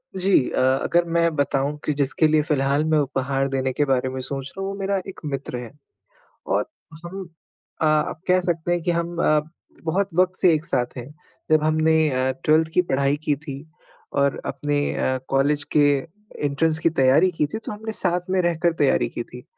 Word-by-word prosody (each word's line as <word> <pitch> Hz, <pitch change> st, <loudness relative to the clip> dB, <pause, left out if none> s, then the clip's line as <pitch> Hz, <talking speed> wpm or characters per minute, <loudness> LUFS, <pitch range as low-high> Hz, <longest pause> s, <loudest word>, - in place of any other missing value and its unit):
जी 190 Hz, +1 st, 0 dB, 0.2 s
अ, -, -, -2 dB, 0.2 s
अगर 175 Hz, 0 st, +2 dB
मैं 170 Hz, -1 st, +2 dB
बताऊँ 140 Hz, 0 st, 0 dB
कि 150 Hz, -, +1 dB
जिसके 140 Hz, +3 st, +2 dB
लिए 155 Hz, 0 st, +3 dB
फ़िलहाल 145 Hz, -1 st, +1 dB
मैं 155 Hz, -, +4 dB
उपहार 135 Hz, 0 st, -1 dB
देने 130 Hz, -1 st, -1 dB
के 145 Hz, +3 st, +1 dB
बारे 130 Hz, -1 st, +1 dB
में 130 Hz, -, -5 dB
सोच 135 Hz, +1 st, -5 dB
रहा 195 Hz, -, -4 dB
हूँ, 195 Hz, -, -3 dB
वो 200 Hz, -, -8 dB
मेरा 195 Hz, 0 st, 0 dB
एक 195 Hz, -, -9 dB
मित्र 135 Hz, -3 st, -4 dB
है, 120 Hz, -1 st, -7 dB, 0.8 s
और -, -, +1 dB, 0.4 s
हम 190 Hz, +2 st, -6 dB, 0.6 s
अ, -, -, +3 dB
आप 155 Hz, +1 st, +1 dB
कह 185 Hz, 0 st, +4 dB
सकते 175 Hz, -1 st, -1 dB
हैं 175 Hz, -1 st, +1 dB
कि 175 Hz, -, +1 dB
हम 170 Hz, 0 st, -2 dB
अ, 155 Hz, 0 st, +4 dB, 0.4 s
बहुत 190 Hz, +5 st, 0 dB
वक़्त 185 Hz, 0 st, +3 dB
से 180 Hz, -4 st, +6 dB
एक 155 Hz, +1 st, -1 dB
साथ 125 Hz, +1 st, -1 dB
हैं। 125 Hz, 0 st, -6 dB, 0.4 s
जब 155 Hz, -1 st, +4 dB
हमने 155 Hz, +1 st, +3 dB
अ, 130 Hz, 0 st, 0 dB
12th 160 Hz, +1 st, +3 dB
की 180 Hz, -, +4 dB
पढ़ाई 140 Hz, -3 st, 0 dB
की 150 Hz, -, +1 dB
थी 140 Hz, -1 st, -8 dB, 0.6 s
और 140 Hz, -1 st, +1 dB
अपने 145 Hz, +1 st, -1 dB
अ, 130 Hz, 0 st, 0 dB
कॉलेज 145 Hz, +2 st, +1 dB
के 145 Hz, -1 st, +6 dB, 0.6 s
एंट्रेंस 155 Hz, +3 st, +1 dB
की 165 Hz, -, +2 dB
तैयारी 140 Hz, +5 st, +4 dB
की 155 Hz, -3 st, 0 dB
थी, 150 Hz, -, -5 dB
तो 220 Hz, -, -7 dB
हमने 220 Hz, +1 st, -6 dB
साथ 180 Hz, -3 st, -1 dB
में 185 Hz, 0 st, +2 dB
रहकर 170 Hz, 0 st, +1 dB
तैयारी 135 Hz, -, +3 dB
की 120 Hz, -, -5 dB
थी। 125 Hz, +2 st, -12 dB
155 Hz, 200 wpm, -23 LUFS, 135-170 Hz, 0.8 s, से